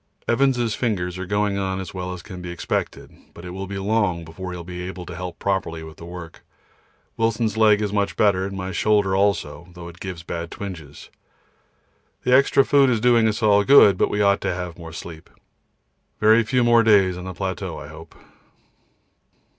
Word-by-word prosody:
Evans' 120 Hz, -2 st, +2 dB
fingers 95 Hz, -6 st, -2 dB
are 95 Hz, -, -5 dB
going 100 Hz, 0 st, 0 dB
on 95 Hz, -1 st, -2 dB
as 95 Hz, -, -7 dB
well 90 Hz, -1 st, -5 dB
as 90 Hz, -1 st, -8 dB
can 90 Hz, -1 st, -9 dB
be 90 Hz, -, -7 dB
expected, 85 Hz, -2 st, -4 dB, 0.2 s
but 85 Hz, -, -11 dB
it 90 Hz, -, -7 dB
will 95 Hz, +2 st, -6 dB
be 100 Hz, +1 st, -5 dB
long 95 Hz, -4 st, 0 dB
before 90 Hz, +3 st, -7 dB
he 90 Hz, -, -6 dB
will 85 Hz, -, -7 dB
be 90 Hz, +1 st, -7 dB
able 90 Hz, 0 st, -7 dB
to 85 Hz, -, -8 dB
help 90 Hz, -1 st, -6 dB
properly 95 Hz, -5 st, -2 dB
with 80 Hz, 0 st, -11 dB
the 85 Hz, -, -10 dB
work. 85 Hz, -1 st, -10 dB, 0.7 s
Wilson's 115 Hz, -1 st, 0 dB
leg 105 Hz, -1 st, +4 dB
much 100 Hz, -1 st, -1 dB
better, 100 Hz, -3 st, +3 dB
and 100 Hz, 0 st, -7 dB
my 95 Hz, 0 st, -4 dB
shoulder 100 Hz, -1 st, +2 dB
also, 95 Hz, -5 st, 0 dB
though 85 Hz, -1 st, -9 dB
it 85 Hz, +1 st, -12 dB
gives 90 Hz, -3 st, -7 dB
bad 85 Hz, 0 st, -5 dB
twinges. 85 Hz, -9 st, -9 dB, 1.1 s
The 125 Hz, -, +2 dB
extra 135 Hz, 0 st, +4 dB
food 140 Hz, -2 st, +4 dB
is 120 Hz, -3 st, +1 dB
doing 120 Hz, -1 st, +4 dB
us 110 Hz, +1 st, -2 dB
all 100 Hz, -1 st, +5 dB
good, 120 Hz, -6 st, +7 dB
but -, -, +1 dB
we 105 Hz, 0 st, 0 dB
ought 100 Hz, 0 st, +3 dB
to -, -, -1 dB
have 90 Hz, -2 st, -5 dB
more 80 Hz, -1 st, -9 dB
sleep. 80 Hz, -1 st, -10 dB, 0.9 s
Very 110 Hz, +2 st, +5 dB
few 125 Hz, +2 st, +1 dB
more 120 Hz, -1 st, +5 dB
days 100 Hz, -5 st, +4 dB
on 90 Hz, 0 st, -8 dB
the 95 Hz, -, -6 dB
plateau 95 Hz, -1 st, -4 dB
I -, -, -8 dB
hope. 80 Hz, +2 st, -13 dB
95 Hz, 195 wpm, -22 LUFS, 90-105 Hz, 1.1 s, good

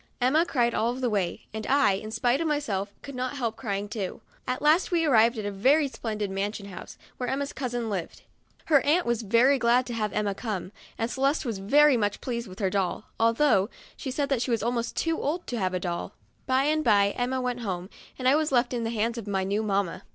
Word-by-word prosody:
Emma 295 Hz, +7 st, +3 dB
cried 240 Hz, -6 st, +1 dB
all 230 Hz, +2 st, +1 dB
the 250 Hz, -2 st, -1 dB
way, 190 Hz, -5 st, -1 dB
and 220 Hz, 0 st, -5 dB
I, 280 Hz, -4 st, +4 dB
in 200 Hz, +3 st, -3 dB
spite 240 Hz, +5 st, +1 dB
of 330 Hz, -, 0 dB
myself, 210 Hz, -10 st, -1 dB
could 280 Hz, -, -8 dB
not 255 Hz, +2 st, -3 dB
help 230 Hz, -4 st, -2 dB
crying 205 Hz, -4 st, -3 dB
too. 205 Hz, -3 st, -5 dB, 0.3 s
At 255 Hz, 0 st, -1 dB
last 310 Hz, +5 st, +4 dB
we 335 Hz, -2 st, +2 dB
arrived 235 Hz, -4 st, +4 dB
at 215 Hz, -, -4 dB
a 205 Hz, -, -2 dB
very 275 Hz, +10 st, +3 dB
splendid 215 Hz, -6 st, -4 dB
mansion 200 Hz, +1 st, -3 dB
house, 185 Hz, -, -10 dB, 0.2 s
where 250 Hz, -1 st, -3 dB
Emma's 280 Hz, +1 st, -2 dB
cousin 245 Hz, -3 st, -3 dB
lived. 190 Hz, -6 st, -4 dB, 0.4 s
Her 290 Hz, -4 st, +5 dB
aunt 320 Hz, +5 st, +3 dB
was 235 Hz, -1 st, 0 dB
very 235 Hz, +6 st, +4 dB
glad 245 Hz, +1 st, +3 dB
to 245 Hz, -, -5 dB
have 215 Hz, -2 st, -1 dB
Emma 210 Hz, -1 st, 0 dB
come, 195 Hz, -4 st, -4 dB, 0.3 s
and 230 Hz, +1 st, -2 dB
Celeste 275 Hz, +3 st, +1 dB
was 225 Hz, -5 st, -3 dB
very 280 Hz, +7 st, +5 dB
much 205 Hz, -2 st, -1 dB
pleased 235 Hz, -2 st, -4 dB
with 185 Hz, 0 st, -11 dB
her 195 Hz, -3 st, 0 dB
doll, 190 Hz, -3 st, -2 dB
although 230 Hz, -3 st, +3 dB, 0.3 s
she 270 Hz, -, -6 dB
said 275 Hz, -2 st, 0 dB
she 250 Hz, -, -2 dB
was 230 Hz, -3 st, 0 dB
almost 235 Hz, 0 st, -2 dB
too 330 Hz, -1 st, 0 dB
old 330 Hz, +5 st, -2 dB
to 240 Hz, -, -3 dB
have 185 Hz, -1 st, 0 dB
a -, -, 0 dB
doll. 175 Hz, +2 st, -4 dB, 0.3 s
By 260 Hz, +1 st, +3 dB
and 310 Hz, +2 st, +1 dB
by 200 Hz, -4 st, +4 dB
Emma 250 Hz, +3 st, -1 dB
went 250 Hz, -1 st, -2 dB
home, 185 Hz, -5 st, -4 dB, 0.3 s
and 255 Hz, -, -1 dB
I 265 Hz, -, +6 dB
was 310 Hz, -1 st, +1 dB
left 245 Hz, -1 st, +2 dB
in 235 Hz, -1 st, -1 dB
the 225 Hz, -, -1 dB
hands 230 Hz, +1 st, -1 dB
of 215 Hz, -, -9 dB
my 195 Hz, -2 st, 0 dB
new 200 Hz, +3 st, 0 dB
mamma. 200 Hz, -4 st, -1 dB
235 Hz, 230 wpm, -27 LUFS, 205-265 Hz, 0.4 s, I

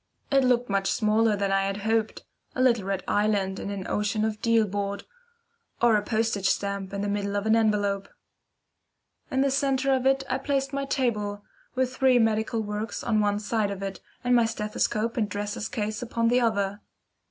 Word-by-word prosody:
It 270 Hz, -1 st, +4 dB
looked 245 Hz, -1 st, +2 dB
much 195 Hz, -1 st, 0 dB
smaller 215 Hz, 0 st, +2 dB
than 200 Hz, -1 st, -1 dB
I 195 Hz, 0 st, +2 dB
had 195 Hz, 0 st, -2 dB
hoped, 220 Hz, 0 st, 0 dB, 0.3 s
a 255 Hz, -, 0 dB
little 235 Hz, -6 st, +3 dB
red 195 Hz, -1 st, -2 dB
island 205 Hz, -2 st, +1 dB
on -, -, -5 dB
an 200 Hz, -2 st, -5 dB
ocean 210 Hz, +1 st, 0 dB
of 215 Hz, -1 st, -3 dB
deal 230 Hz, -1 st, +3 dB
board, 200 Hz, 0 st, -3 dB, 0.8 s
or 235 Hz, -2 st, +4 dB
a 210 Hz, -, +2 dB
postage 215 Hz, -2 st, 0 dB
stamp 200 Hz, -1 st, -2 dB
in 200 Hz, 0 st, -3 dB
the 205 Hz, -, -1 dB
middle 200 Hz, 0 st, -2 dB
of 205 Hz, +1 st, -1 dB
an 220 Hz, 0 st, +4 dB
envelope. 205 Hz, -3 st, +1 dB, 1.2 s
In 265 Hz, -, +1 dB
the 275 Hz, 0 st, +2 dB
centre 275 Hz, 0 st, +1 dB
of 260 Hz, 0 st, +1 dB
it 270 Hz, 0 st, +3 dB
I 255 Hz, -, -1 dB
placed 270 Hz, 0 st, -1 dB
my 275 Hz, 0 st, -1 dB
table, 210 Hz, -7 st, -1 dB, 0.3 s
with 255 Hz, 0 st, 0 dB
three 260 Hz, -1 st, +4 dB
medical 225 Hz, 0 st, +1 dB
works 210 Hz, +1 st, -4 dB
on 220 Hz, -2 st, +1 dB
one 205 Hz, -1 st, +2 dB
side 210 Hz, 0 st, -1 dB
of 200 Hz, -1 st, -5 dB
it, 195 Hz, -1 st, -5 dB, 0.2 s
and 245 Hz, 0 st, +3 dB
my 235 Hz, -1 st, +5 dB
stethoscope 220 Hz, +1 st, -1 dB
and 215 Hz, -3 st, 0 dB
dresser's 205 Hz, +1 st, -4 dB
case 215 Hz, -3 st, -3 dB
upon 230 Hz, -1 st, 0 dB
the 250 Hz, +1 st, +3 dB
other. 205 Hz, -3 st, 0 dB
215 Hz, 190 wpm, -26 LUFS, 205-240 Hz, 1.2 s, my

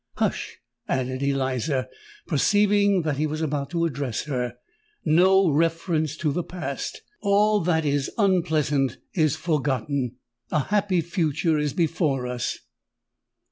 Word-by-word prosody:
"Hush!" -, -, -2 dB, 0.3 s
added 130 Hz, 0 st, -1 dB
Eliza, 135 Hz, -1 st, 0 dB, 0.4 s
perceiving 200 Hz, +3 st, +3 dB
that 150 Hz, -3 st, -1 dB
he 155 Hz, +1 st, +1 dB
was 155 Hz, +1 st, -3 dB
about 145 Hz, -3 st, -2 dB
to 170 Hz, -1 st, 0 dB
address 140 Hz, -7 st, -2 dB
her: 125 Hz, -5 st, -3 dB, 0.5 s
"no 185 Hz, +4 st, +5 dB
reference 160 Hz, 0 st, 0 dB
to 155 Hz, -2 st, 0 dB
the 175 Hz, -, -1 dB
past! 180 Hz, +1 st, -5 dB, 0.2 s
All 210 Hz, +1 st, +3 dB
that 160 Hz, -3 st, +1 dB
is 145 Hz, -1 st, 0 dB
unpleasant 155 Hz, -, +2 dB, 0.2 s
is 155 Hz, -5 st, +2 dB
forgotten:—a 135 Hz, -5 st, -2 dB
happy 195 Hz, +2 st, +1 dB
future 165 Hz, -2 st, 0 dB
is 150 Hz, -2 st, -1 dB
before 155 Hz, -6 st, 0 dB
us!" 125 Hz, -1 st, -3 dB
155 Hz, 120 wpm, -25 LUFS, 135-175 Hz, 0.5 s, no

